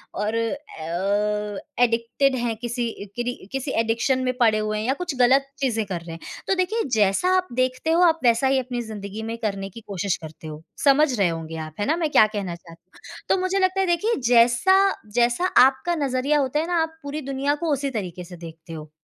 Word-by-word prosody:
और 210 +2 -1
अ, 210 - -2 0.2
एडिक्टेड 240 +3 +1
हैं 240 -2 -1
किसी 240 0 -2 0.3
किरी 245 0 -2 0.2
किसी 270 +1 -2
एडिक्शन 230 +4 +1
में 255 - +1
पड़े 225 -3 +4
हुए 215 0 -2
हैं 215 - -3
या 265 - +3
कुछ 350 -6 -4
गलत 270 +2 +4
चीज़ें 230 -5 0
कर 185 -4 -4
रहे 170 0 -9
हैं। - - -11 0.3
तो 385 - +2
देखिए 375 +5 0
जैसा 205 - +2
आप 370 0 -1
देखते 255 +5 0
हो 335 +2 +3
आप 325 -2 +4
वैसा 235 +2 +3
ही 265 0 +3
अपनी 250 -1 -4
जिंदगी 215 -1 -7
में 225 +1 -4
करने 200 -4 -3
की 230 +4 -11
कोशिश 200 -1 -2
करते 160 0 -10
हो। 155 0 -8 0.2
समझ 280 0 +5 0.2
रहे 195 - +4
होंगे 165 -1 -5
आप, 155 -1 -6
है 205 - 0
ना? 310 - +2
मैं 325 -3 0
क्या 215 - +7
कहना 195 -5 -3
चाहती 170 -1 -17
हूँ। - - -14
तो - - +4
मुझे 370 +1 0
लगता 375 0 +1
है 385 - +3
देखिए 350 +7 +1
जैसा 240 +9 +5 0.4
जैसा 240 +8 +2 0.2
आपका 265 +6 0
नज़रिया 280 0 +1
होता 275 +1 0
है 320 - -2
ना 345 -2 +1
आप 320 0 -7
पूरी 285 +2 -5
दुनिया 275 +1 -1
को 325 - +1
उसी 280 0 -1
तरीके 180 -2 -7
से 175 0 -11
देखते 165 0 -11
हो। 155 -1 -9
240 Hz, 215 wpm, -23 LUFS, 200-280 Hz, 0.4 s, क्या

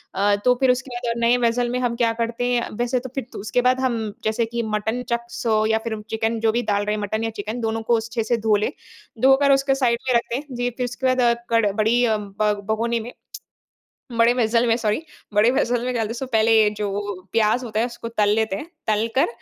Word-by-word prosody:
अ, 200 +1 +3
तो 250 - +6
फिर 260 -2 +4
उसके 255 +1 -3
बाद 240 -1 -3
और 235 - -6
नए 235 +1 +4
वेसेल 240 +1 0
में 250 +1 -1
हम 245 -2 -1
क्या 235 -1 +2
करते 230 +1 -2
हैं 240 - 0
वैसे 245 +1 0
तो 260 +1 -8
फिर 270 -4 -3
तो - - -6
उसके 215 +4 0
बाद 255 +1 +2
हम 250 -3 +1 0.3
जैसे 220 +1 0
कि 235 +1 -3
मटन 220 +3 -2
चक्स 235 -1 -3
हो 215 -1 +3
या 220 0 +2
फिर 220 -2 -3
चिकन 225 +1 -1
जो 225 0 +2
भी 235 +2 0
डाल 205 0 +1
रहे 210 0 0
हैं 210 - -4
मटन 220 +2 -2
या 225 - 0
चिकन 215 +4 -5
दोनों 225 0 -1
को 230 - +5
स 225 - -6
अच्छे 230 -1 -2
से 235 +2 0
धो 220 -1 +3
ले। 210 +5 0 0.5
धोकर 270 +2 +5
उसके 270 0 +3
साइड 245 -3 +1
में 250 - +3
रखते 235 0 0
हैं। 290 +3 -4
वी 245 0 0
फिर 250 - -1
उसके 245 +2 -4
बाद 240 -2 +3 0.2
क़ड 225 -3 +3
बड़ी 225 +3 +2
अ, 220 -2 +2
ब 210 +1 -1 0.2
भगोनी 230 +1 0
में। 235 +3 -8 1.0
बड़े 230 +1 +5
वेसेल 235 -1 +2
में 225 - +3
सॉरी 215 +3 0 0.3
बड़े 210 +3 +5
वेसेल 245 -2 +1
में 255 - -1
डालते 225 -2 -1
तो 265 - -3
पहले 220 -1 +4
जो 210 -1 -2 0.4
प्याज़ 225 +3 +2
होता 215 -2 -2
है 230 - +2
उसको 235 -1 -7
तल 210 -1 +3
लेते 220 -3 0
हैं, 205 - -6 0.2
तल 215 +1 +1
कर, 270 - +4
230 Hz, 245 wpm, -22 LUFS, 220-245 Hz, 1.0 s, तो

